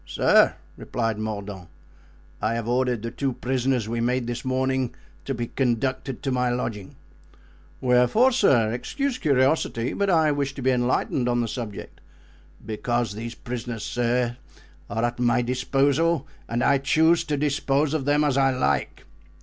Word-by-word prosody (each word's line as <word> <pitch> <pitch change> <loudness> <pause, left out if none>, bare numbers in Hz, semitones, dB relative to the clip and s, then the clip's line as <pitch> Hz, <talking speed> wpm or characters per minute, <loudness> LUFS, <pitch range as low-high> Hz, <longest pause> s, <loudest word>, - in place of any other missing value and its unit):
"Sir," - - +4 0.2
replied 115 -3 -2
Mordaunt, 100 -5 -5 0.7
"I 110 +2 0
have 115 -1 -3
ordered 125 -2 0
the 115 - -4
two 135 -2 -2
prisoners 125 -2 -1
we 115 +1 -2
made 125 +1 0
this 120 0 -4
morning 130 -1 -1 0.3
to 135 - -2
be 120 0 -2
conducted 130 +1 -2
to 135 - -1
my 125 -1 +1
lodging." 115 -5 -4 0.9
"Wherefore, 125 - +4
sir? 130 - +3
Excuse 255 - -2
curiosity, 130 -4 +1
but 200 -1 0
I 160 -4 +4
wish 140 -1 -2
to 135 - -6
be 130 - +3
enlightened 125 0 0
on 120 0 +1
the 115 - -1
subject." 110 -2 -7 0.6
"Because 120 0 -1
these 115 +3 -6
prisoners, 120 -2 -5
sir, 120 0 0 0.5
are 115 0 -2
at 120 0 -1
my 120 0 +2
disposal 140 +5 +1 0.2
and 120 +1 0
I 140 -1 +4
choose 160 +5 +3
to 150 -1 -1
dispose 145 0 +1
of 150 -4 -1
them 145 +1 +3
as 140 -3 +1
I 135 0 +4
like." 130 -1 -1
125 Hz, 155 wpm, -24 LUFS, 120-140 Hz, 0.9 s, Sir